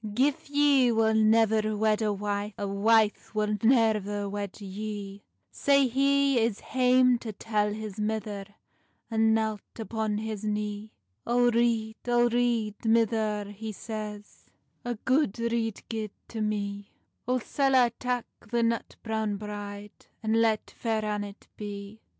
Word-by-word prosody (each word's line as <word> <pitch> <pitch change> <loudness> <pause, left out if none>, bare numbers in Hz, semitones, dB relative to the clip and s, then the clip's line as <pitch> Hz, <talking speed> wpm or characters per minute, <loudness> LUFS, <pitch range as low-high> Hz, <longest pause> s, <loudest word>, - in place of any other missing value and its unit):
"Gif 275 +3 +1
ye 285 -4 +4
wull 220 -1 +3
nevir 220 -1 +3
wed 215 0 +2
a 215 -1 +1
wife, 205 0 -3
A 200 - -3
wife 215 +2 +2
wull 210 0 +1
neir 215 -4 +2
wed 200 0 -5
yee;" 200 0 -6 0.3
Sae 280 -1 +3
he 275 +1 +3
is 225 -2 0
hame 250 -1 +3
to 225 - -5
tell 210 0 -1
his 215 -1 -6
mither, 210 -2 -2 0.7
And 220 0 +3
knelt 220 -2 -1 0.2
upon 220 -2 -2
his 215 -1 -4
knee. 210 0 -3 0.4
"O 245 0 +4
rede, 230 -1 +1
O 240 0 +4
rede, 235 -3 0
mither," 220 -2 +1
he 215 +2 -6
says, 210 -1 -7 0.4
"A 240 0 -2
gude 260 -5 +2
rede 230 -2 -1
gie 220 -2 -3 0.2
to 225 - -4
mee; 205 -1 -2 0.4
O 255 +1 +2
sall 270 +2 +1
I 245 -2 +6
tak 245 +1 -2 0.2
the 235 0 +1
nut 230 0 -1
browne 220 -2 -1
bride, 205 0 -8 0.2
And 220 +1 +2
let 220 -2 +1
Faire 220 -2 -2
Annet 205 -1 -4
bee?" 205 +1 -7
220 Hz, 140 wpm, -28 LUFS, 210-235 Hz, 0.7 s, I